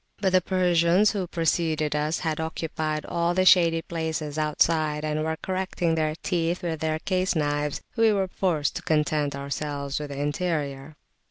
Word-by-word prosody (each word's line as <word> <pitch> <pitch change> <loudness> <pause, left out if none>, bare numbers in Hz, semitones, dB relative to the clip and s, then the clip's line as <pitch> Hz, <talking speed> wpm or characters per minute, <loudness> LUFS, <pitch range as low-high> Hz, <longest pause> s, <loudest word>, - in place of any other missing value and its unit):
But 195 -2 +1
the 185 0 +4
Persians 180 +2 +3
who 195 -4 -3
preceded 160 -3 0
us 150 +2 0
had 160 -2 -1
occupied 160 -1 -3
all 170 +1 0
the 185 0 +2
shady 165 -3 +5
places 160 -3 -3
outside, 155 0 +1
and 155 0 -1
were 160 0 -2
correcting 185 -3 -1
their 155 -1 0
teeth 170 -1 -1
with 165 -3 -2
their 155 0 0
case 185 +3 0
knives; 145 -1 -1
we 225 -1 +4
were 195 -2 +1
forced 170 -6 -1
to - - -5
content 150 -2 0
ourselves 140 0 -3
with 150 -1 -5
the 140 0 -6
interior. 145 -2 -2
160 Hz, 165 wpm, -25 LUFS, 150-175 Hz, -, shady